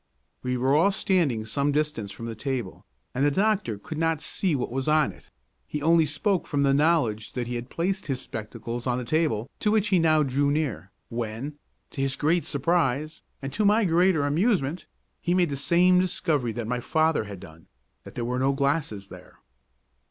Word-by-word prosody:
We 125 0 -1
were 130 +2 +2
all 170 +7 +4
standing 165 - +1
some 140 +6 0
distance 150 -8 -1
from 115 - -8
the 115 - -4
table, 120 -3 -4 0.3
and 130 - 0
the 145 - +5
doctor 195 - +1
could 155 +9 -7
not 165 -1 +1
see 180 +1 -1
what 125 -3 -2
was 135 +2 -2
on 155 -1 +3
it; - - -19 0.4
he 150 - -3
only 160 +1 +4
spoke 175 +6 0
from 145 -2 0
the 135 -1 +3
knowledge 140 -8 +1
that 125 -1 -2
he 120 - -5
had 120 +1 -5
placed 190 +3 -2
his 135 -3 -1
spectacles 115 0 -6
on 125 -1 +1
the 125 - -4
table, 130 -6 0
to 210 - +1
which 210 -1 +2
he 190 -2 +4
now 155 -2 +4
drew 140 +1 +1
near, 145 -10 -2 0.2
when, 120 +5 -5 0.3
to 135 - -4
his 135 0 0
great 160 +1 +1
surprise, 155 0 0 0.2
and 135 0 -4
to 215 - 0
my 210 +2 +4
greater 170 -3 +3
amusement, 165 - 0 0.3
he 175 - +1
made 175 -4 +2
the - - -1
same 175 +6 +4
discovery 155 -8 0
that 115 0 -4
my 125 +2 -2
father 155 -1 +1
had 100 -3 -8
done, 80 -1 -14 0.4
that - - -12
there 120 - -2
were 125 +1 -1
no 135 +1 +2
glasses 140 -8 -1
there. - - -13
145 Hz, 195 wpm, -26 LUFS, 125-165 Hz, 0.4 s, the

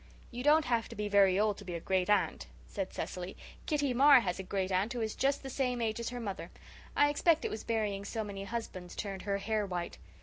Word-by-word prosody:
"You 245 0 -5
don't 300 +3 +5
have 235 -2 0
to - - -8
be 210 0 -2
very 200 -2 +5
old 210 -1 +1
to - - -9
be 180 -3 -5
a - - -3
great 185 +2 0
aunt," 195 - +1 0.2
said - - -4
Cecily. 180 +1 -5 0.3
"Kitty 290 -4 +1
Marr 275 +1 +7
has 180 -3 -2
a - - -1
great 190 0 -2
aunt 195 +6 +1
who 240 - -3
is 220 -1 -1
just 275 +1 0
the 270 - -5
same 250 -2 0
age 225 -1 -1
as 235 - -2
her 245 0 -5
mother. 195 -6 -5 0.5
I 290 - +5
expect 315 +2 +3
it - - -1
was 215 - -5
burying 210 -3 -1
so 220 +2 -3
many 200 -1 -6
husbands 195 -5 -5
turned 195 -2 -4
her 200 +1 -1
hair 215 +1 -1
white. 180 -3 -4
210 Hz, 240 wpm, -32 LUFS, 190-245 Hz, 0.5 s, Marr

